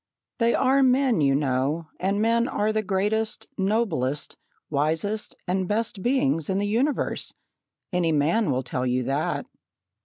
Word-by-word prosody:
"They 235 0 +3
are 270 +1 +3
men, 255 - +3
you 135 -1 +3
know, 145 +3 0
and 195 +2 0
men 230 +2 +2
are 210 +1 0
the 215 - +1
greatest, 210 +3 -1
noblest, 190 - -1 0.3
wisest, 160 +9 -1
and 185 0 0
best 215 -1 -1
beings 165 - +1
in 190 - +1
the 200 - 0
universe. 245 +8 -1 0.6
Any 175 -2 +2
man 160 +7 +2
will 130 -1 0
tell 125 +1 -2
you 125 0 +1
that." 135 +5 -1
190 Hz, 145 wpm, -25 LUFS, 145-225 Hz, 0.6 s, They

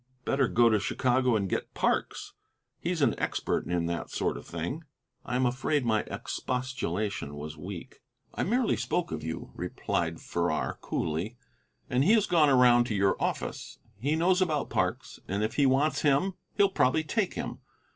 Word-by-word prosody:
"Better 135 -2 +2
go 120 +1 +4
to 110 -2 +4
Chicago 125 +3 +1
and 100 -3 0
get - - -3
Parks. - - -1 0.5
He's 170 -3 -1
an - - +4
expert - - -1
in 85 -1 0
that 85 0 -3
sort - - -1
of - - -9
thing." 85 - -4 0.4
I 125 - -3
am 130 +1 +2
afraid 130 +3 0
my 110 -2 +3
expostulation 110 - -3
was 75 +1 -6
weak. 90 +3 -8 0.3
"I - - -3
merely 240 +5 +2
spoke 175 -1 -1
of - - -3
you," 80 +1 -5
replied 85 -1 -2
Farrar, 85 -2 -1
coolly, 85 +9 -2 0.5
"and 125 +2 +2
he 200 - +5
has 215 -3 +4
gone 160 -4 +4
around 125 -2 +6
to 110 - -2
your 100 0 +3
office. - - -3 0.2
He 145 +7 +1
knows 180 +3 +3
about 155 -5 0
Parks, - - -1
and 100 +3 -1
if 110 +1 -1
he 140 -2 +3
wants 140 +2 +2
him 150 +7 +2 0.2
he'll 200 -1 +5
probably 155 -4 +2
take 200 +5 -1
him. - - -4
125 Hz, 170 wpm, -29 LUFS, 95-150 Hz, 0.5 s, around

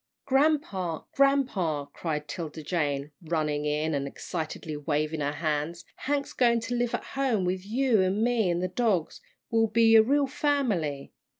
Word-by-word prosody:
"Grampa, 265 - +1
grampa!" 235 - +1
cried 150 -3 -3
'Tilda 160 -1 -6
Jane, 145 -3 -1
running 155 -3 -1
in, 150 +2 0
and 140 -1 -1
excitedly 155 +1 -5
waving 150 +1 -1
her 145 0 0
hands, 155 +2 -2
"Hank's 285 0 -2
goin' 235 -2 +3
to 245 - -4
live 240 -1 0
at - - -5
home 255 -8 0
with 185 +1 -1
you, 240 -1 +2
an' 190 +4 +1
me, 235 -5 +2
an' 175 0 0
the 185 - 0
dogs. 190 -4 0 0.3
We'll 225 -1 +3
be 225 +1 +5
a 220 - +10
real 280 +5 +2
family. 235 - -1
185 Hz, 160 wpm, -27 LUFS, 155-240 Hz, 0.3 s, a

